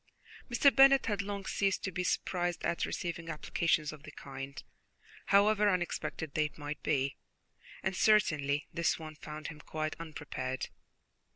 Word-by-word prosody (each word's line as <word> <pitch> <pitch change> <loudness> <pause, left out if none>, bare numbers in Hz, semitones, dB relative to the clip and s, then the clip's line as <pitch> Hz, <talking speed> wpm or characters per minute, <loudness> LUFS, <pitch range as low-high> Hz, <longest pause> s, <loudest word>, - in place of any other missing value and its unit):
Mr. 265 +3 +5
Bennet 275 0 +7
had 210 -3 0
long 200 -1 -5
ceased 195 0 0
to 190 - -2
be 180 0 -2
surprised 175 -1 -1
at 170 - 0
receiving 170 -2 -4
applications 155 0 0
of 150 - -11
the 150 - -10
kind, 135 -1 -8 0.6
however 210 +1 +5
unexpected 175 -4 -2
they 150 -1 +1
might 145 0 -5
be, 140 -2 0 0.7
and 190 0 -1
certainly 155 -9 +3
this 170 -1 +1
one 155 -1 -8
found 155 0 -7
him 155 -1 -10
quite 155 +1 -3
unprepared. 145 -5 -4
165 Hz, 145 wpm, -32 LUFS, 150-195 Hz, 0.7 s, Bennet